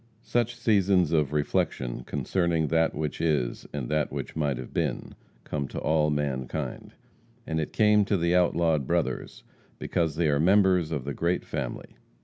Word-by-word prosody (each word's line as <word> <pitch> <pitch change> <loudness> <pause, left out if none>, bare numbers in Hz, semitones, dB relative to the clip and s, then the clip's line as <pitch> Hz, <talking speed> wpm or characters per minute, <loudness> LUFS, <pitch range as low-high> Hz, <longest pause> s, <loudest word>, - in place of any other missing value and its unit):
Such 120 0 0
seasons 100 -7 +2
of 75 -4 +2
reflection 65 -4 -1
concerning 80 +3 0
that 80 0 +2
which 75 -2 -3
is, 75 -7 0
and 70 -4 -4
that 75 0 0
which - - -5
might 75 -4 0
have 65 -1 -8
been, - - -2 0.3
come 70 -2 -3
to - - -8
all 75 -1 +2
mankind, 70 -4 -3 0.5
and 80 0 -2
it 75 - -3
came 105 -1 +4
to 100 -1 +1
the 85 0 +1
outlawed 85 -5 +2
brothers, - - -2 0.3
because 80 -3 -1
they 80 0 +1
are 70 -1 +2
members 90 -1 +4
of 70 -5 -3
the 70 - -3
great 85 +4 -1
family. - - -5
80 Hz, 160 wpm, -27 LUFS, 75-90 Hz, 0.5 s, came